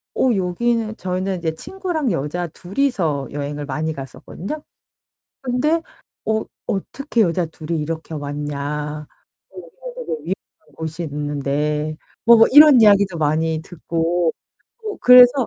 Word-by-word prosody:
어 250 -4 +3
여기는 220 +4 0
저희는 185 +1 -2
이제 160 -2 -2
친구랑 345 - -3
여자 170 +3 -2
둘이서 175 - -1
여행을 145 0 -4
많이 155 +3 -2
갔었거든요. 180 - -7 0.8
근데 270 +6 +1 0.4
"어, 220 0 +1 0.2
어떻게 235 +5 -1
여자 175 -2 +2
둘이 160 0 -4
이렇게 160 +1 -5
왔냐? 145 0 -4 0.4
어 190 - -23
여기선 - - -9
되게 - - -6
위험한 185 +4 -8
곳이 160 +1 -5
있는데." 150 +1 -2 0.3
뭐 235 0 +8
뭐 225 - +7
이런 295 -1 +9
이야기도 200 -4 +5
많이 160 +1 0
듣고 170 0 -1 0.5
뭐 425 -2 -5
그래서 250 0 +9
170 Hz, 280 characters per minute, -21 LUFS, 150-230 Hz, 0.8 s, 이런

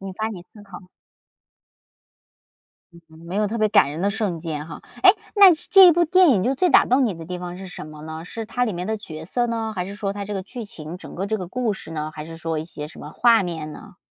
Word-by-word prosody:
引 195 -1 -7
发 220 +2 -2
你 185 -6 -8
思 210 - -14
考。 185 -2 -12 2.1
嗯 170 - -16
嗯， 160 - -16
没 180 - -6
有 210 0 +2
特 230 +2 -3
别 215 0 +3
感 140 - +4
人 155 - -6
的 200 +2 +1
瞬 200 -5 -2
间 155 -2 -5
哈。 160 - -9 0.2
诶， - - +10 0.2
那 395 -3 +9
是 315 - -5
这 385 -2 +9
一 345 - +8
部 345 +2 +3
电 365 +1 +5
影 195 -7 +3
就 260 +3 +1
最 355 +6 +2
打 - - +6
动 255 +2 +3
你 210 -7 -1
的 165 0 -9
地 180 +1 -6
方 180 0 -7
是 195 - -8
什 180 - -8
么 155 0 -11
呢？ 160 +1 -7
是 225 +4 -7
它 245 +2 0
里 220 - -2
面 180 +1 -4
的 220 0 -1
角 160 -6 -9
色 240 +7 0
呢？ 225 -1 -3
还 180 - -2
是 200 - -7
说 205 -1 -3
它 200 0 -5
这 205 0 -5
个 190 - -3
剧 230 +4 -8
情， 165 -3 -9
整 - - -11
个 195 +3 -3
这 220 +1 -1
个 180 -3 -6
故 245 0 -1
事 190 - -9
呢？ 155 -1 -4
还 150 - -7
是 165 0 -9
说 165 -1 -3
一 155 - -4
些 150 -3 -8
什 - - -13
么 150 - -9
画 230 +3 +4
面 160 -4 -5
呢？ 205 0 -13
195 Hz, 300 characters per minute, -22 LUFS, 165-225 Hz, 2.1 s, 诶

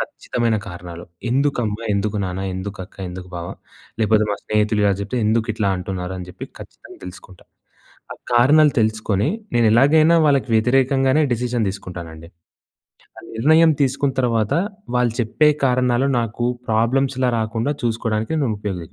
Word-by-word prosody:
ఖచ్చితమైన 115 -2 -2
కారణాలు. 85 -1 -9 0.3
ఎందుకమ్మా, 125 -5 0
ఎందుకు 100 +1 -1
నాన్న, 90 +1 -4
ఎందుకు 95 +2 -6
అక్క, - - -21
ఎందుకు 90 0 -8
బావ 85 0 -6 0.5
లేపోతే 110 0 +3
మా 100 - -1
స్నేహితులు 105 0 +1
ఇలా 100 - +4
జెప్తే 100 +5 -4
ఎందుకు 110 +1 +1
ఇట్లా 105 -2 -1
అంటున్నారు 90 0 -5
అని 90 -1 -7
జెప్పి - - -8
ఖచ్చితంగా - - -13
తెలుసుకుంటా. 90 0 -12 0.7
ఆ - - -8 0.2
కారణాలు 145 +5 +5
తెలుసుకొని 110 +1 0 0.3
నేను 120 -1 +3
ఎలాగైనా 155 +7 +5
వాళ్ళకి 140 -3 +2
వ్యతిరేకంగానే 135 +5 +3
డిసిషన్ 120 -2 -1
తీసుకుంటానండి. 85 -4 -9 0.9
ఆ - - -8 0.2
నిర్ణయం 160 +7 +5
తీసుకున్న 135 +1 0
తర్వాత 115 -4 0 0.4
వాళ్ళు 120 -2 +1
చెప్పే 150 +7 +3 0.2
కారణాలు 125 0 +2
నాకు 115 +1 -3 0.2
ప్రాబ్లమ్స్‌లా 130 +3 +1
రాకుండా 115 +6 -1
చూసుకోవడానికి 115 +1 -1
నేను 130 -7 0
ఉపయోగ 100 -4 -4
115 Hz, 135 wpm, -20 LUFS, 100-130 Hz, 0.9 s, కారణాలు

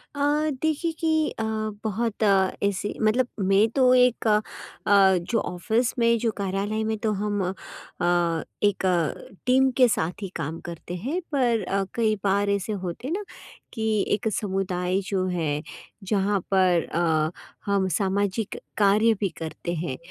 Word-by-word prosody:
अ, 285 - -4 0.4
देखिए 315 +1 0
कि 315 -2 +2
अ, - - 0 0.4
बहुत 220 +1 -1 0.4
ऐसे 200 +1 -1
मतलब 230 +4 +3
मैं 195 +2 +4
तो 255 0 +4
एक 250 -2 +3
अ, 210 0 +4 0.5
जो 195 +1 +4
ऑफिस 220 +8 -1
में, 235 0 +4
जो 230 0 0
कार्यालय 200 +2 -1
में 220 0 -1
तो 215 +1 -1
हम 205 0 -1
अ, 175 -2 -2 0.2
एक 205 -2 +2
अ, 175 -2 -1
टीम 260 +1 +4
के 255 -2 +7
साथ 180 -4 -1
ही 195 - -4
काम 160 +4 -4
करते 175 +1 -7
हैं, 265 - -2
पर 245 -6 +2
अ, 195 +2 0
कई 220 -2 +2
बार 200 0 +2
ऐसे 200 +1 -1
होते 185 +4 -5
हैं 310 - -2
ना 415 - -3 0.5
कि 220 -3 0
एक 220 - -4
समुदाय 190 -2 -1
जो 190 -2 0
है, 155 -5 -1 0.4
जहाँ 200 0 +1
पर 185 -3 +3
अ, 160 -2 +1 0.3
हम 200 -1 +1
सामाजिक 200 +1 -1 0.2
कार्य 215 +2 +4
भी 200 - 0
करते 165 +1 -5
हैं, 130 -7 -3
200 Hz, 150 wpm, -25 LUFS, 185-225 Hz, 0.5 s, के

